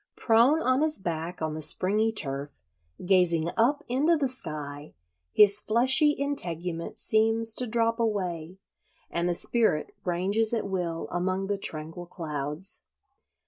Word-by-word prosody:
Prone 245 +8 +3
on 255 +2 +2
his 310 0 +2
back 170 -2 -5
on 155 -1 -2
the 155 - -6
springy 210 +8 +1
turf, 140 -8 -4 0.5
gazing 175 -3 +2
up 245 +6 +1
into 295 +7 +2
the 280 -2 0
sky, 150 - -5 0.4
his 205 -1 +6
fleshy 265 +7 +4
integument 175 - -2
seems 225 +1 +2
to 250 +2 -2
drop 230 +1 0
away, 185 -6 -3 0.5
and 170 +1 -1
the 175 - 0
spirit 220 -7 +1
ranges 200 +6 0
at 220 - -3
will 175 -4 -3
among 185 +2 -2
the 200 +1 -2
tranquil 160 +1 -3
clouds. 150 +1 -5
190 Hz, 135 wpm, -26 LUFS, 165-230 Hz, 0.5 s, his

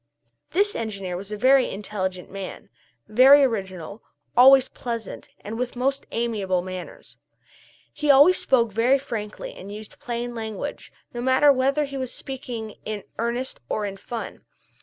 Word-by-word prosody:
This 410 +2 +1
engineer 195 -5 -4
was 195 +3 -7
a 210 - -3
very 260 +3 +4
intelligent 190 -2 -4
young - - -16
man, 195 -1 -7 0.4
very 265 +6 +7
original, 195 -5 -3 0.3
always 265 +1 +8
pleasant, 230 -3 -6
and 220 +3 -6
with 250 0 -3
most 275 +3 -1
amiable 205 -6 -1
manners. 185 -1 -9 0.7
He 295 0 -2
always 285 +7 +7
spoke 235 -4 +2
very 235 +6 +3
frankly 215 -6 -6
and 195 +2 -10
used 215 0 -10
plain 240 0 -4
language, 220 -3 -6 0.2
no 240 - -4
matter 260 +3 +5
whether 275 +3 +1
he 275 -1 -6
was 255 -2 -3
speaking 245 -5 -6
in 215 -2 -5 0.2
earnest 240 +3 -2
or 210 - -1
in 195 -1 -4
fun. 230 +3 -7
235 Hz, 150 wpm, -24 LUFS, 205-260 Hz, 0.7 s, always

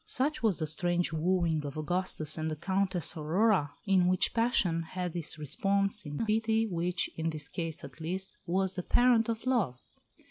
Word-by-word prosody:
Such 290 +4 0
was 220 -6 +2
the 160 - -1
strange 175 +2 0
wooing 165 -1 +1
of 145 0 -6
Augustus 175 0 -1
and 160 0 -2
the 155 - -3
Countess 185 +1 0
Aurora, 165 0 +2
in 190 -3 +4
which 185 0 +2
passion 220 -8 +2
had 180 +1 -5
its 165 -2 -3
response 195 +6 0
in 145 0 -5
a - - 0
pity 220 +1 +2
which, 175 -3 -1
in 165 0 -1
this 155 -2 -2
case 165 -3 -4
at 140 +3 -11
least, 190 +4 -3 0.2
was 190 +2 +1
the 180 - -3
parent 235 +3 +3
of 225 +1 -3
love. 210 - +1
180 Hz, 180 wpm, -30 LUFS, 160-200 Hz, 0.2 s, in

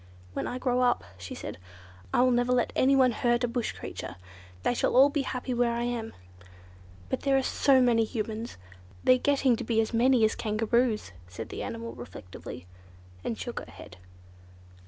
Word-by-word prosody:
"When - - -2
I 250 - -3
grow 250 -1 +1
up," 245 -1 +2
she 90 -1 -8
said, - - -7 0.5
"I - - +4
will 255 - +4
never 245 +1 +2
let 250 -1 +1
anyone 265 -1 +5
hurt 240 +1 +1
a - - +3
bush 235 -1 -2
creature. - - -7 0.5
They - - +2
shall 245 - 0
all 275 +2 +8
be 290 -1 0
happy 255 -1 -3
where 240 -1 +2
I 235 0 -1
am." 240 -2 -3 1.0
"But - - -1
there 275 -1 +3
are 265 - +1
so 270 0 +4
many 235 -2 +4
Humans. 220 - -4 0.5
They're 255 0 +5
getting 275 -2 +3
to - - -4
be 225 -2 +1
as 225 +1 0
many 240 0 +4
as 220 - +1
Kangaroos." 220 - 0 0.2
said 100 +5 -7
the - - -6
animal 230 0 -5
reflectively, 90 -6 -9 0.6
and 225 - -3
shook 240 - -5
her - - -10
head. 90 -3 -12
240 Hz, 180 wpm, -28 LUFS, 225-255 Hz, 1.0 s, all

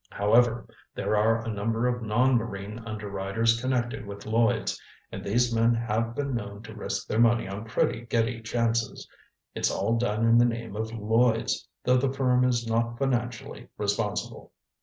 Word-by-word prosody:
However, 115 +4 +2 0.3
there - - 0
are 110 +2 +2
a 115 - -2
number 115 +4 0
of 125 0 -1
non 120 +4 +2
marine 105 -2 -3
underwriters 105 +2 -1
connected 125 -2 -1
with 100 0 -9
Lloyds, 115 0 +1 0.3
and - - -6
these 120 +4 +1
men 115 +1 +3
have 115 0 -1
been 140 -2 -2
known 105 -2 -5
to - - -10
risk - - -4
their 110 - -1
money 115 -2 +4
on 100 +3 -6
pretty 115 +1 -1
giddy 115 0 0
chances. 115 -1 -1 0.5
It's - - +1
all 115 0 0
done 115 -1 0
in 115 +1 +6
the 120 - +6
name 115 -3 -3
of 110 +1 -3
Lloyds, 115 +1 +1 0.2
though 125 +1 +4
the 130 +1 +1
firm 125 -2 +2
is 120 -2 +1
not 115 +1 0
financially 120 -3 -2
responsible." 105 0 -2
115 Hz, 165 wpm, -27 LUFS, 110-120 Hz, 0.5 s, in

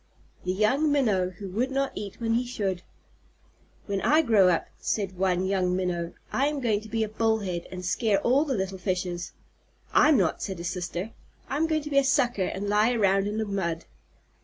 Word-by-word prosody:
THE 180 - +1
YOUNG 255 +10 +2
MINNOW 210 -11 +2
WHO 200 -2 -7
WOULD 240 +7 0
NOT 275 0 0
EAT 200 -1 -7
WHEN 225 -1 0
HE 240 +2 +1
SHOULD 195 -7 -2 1.0
"When 200 -2 -2
I 310 +2 +4
grow 215 -8 +5
up," 170 - +1
said 195 -3 -2
one 185 0 +1
young 185 -2 +1
Minnow, 175 -2 -2 0.2
"I 275 +2 +2
am 295 -1 -2
going 220 -5 +1
to 220 - -12
be 225 0 0
a - - -1
Bullhead, 210 -5 -1
and 180 -1 -6
scare 205 +2 +1
all 260 +7 +3
the 280 -4 -1
little 190 0 -3
fishes." 180 -2 -3 0.6
"I'm 300 -2 +6
not," 185 -6 +1
said 190 -2 -4
his 170 0 -3
sister. 180 +3 -4 0.4
"I'm 300 +4 0
going 310 -2 0
to 300 - -6
be 275 - +5
a - - +2
Sucker, 245 -7 +2
and 200 +2 -3
lie 210 +3 +3
around 195 -3 +2
in 210 +1 -3
the 220 - 0
mud." 170 -5 -2
205 Hz, 200 wpm, -27 LUFS, 185-245 Hz, 1.0 s, I'm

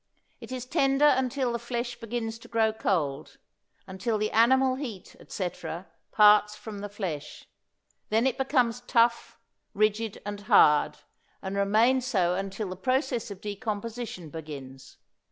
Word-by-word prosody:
It - - -11
is 255 -1 -4
tender 275 0 +2
until 260 -2 +2
the 235 - -2
flesh 240 +1 -4
begins 230 -1 -4
to - - -14
grow 225 -1 +1
cold, 160 -10 -2 0.5
until 200 +4 -2
the 215 0 -1
animal 260 +3 +4
heat, 250 -8 -7
etc., 180 -1 -5 0.3
parts 210 0 +5
from 210 -1 -8
the 205 +1 -6
flesh. 175 -8 -6 0.6
Then 225 +3 +2
it 265 - +1
becomes 250 -3 +1
tough, 235 -1 +1 0.4
rigid 215 +1 0
and 205 0 -5
hard, 150 -8 +4 0.5
and 190 0 -4
remains 225 +6 +3
so 185 -8 +2
until 195 +2 -4
the 185 - -5
process 255 - -1
of 200 -1 -9
decomposition 210 -4 -5
begins. 140 -4 -9
220 Hz, 135 wpm, -27 LUFS, 195-245 Hz, 0.6 s, parts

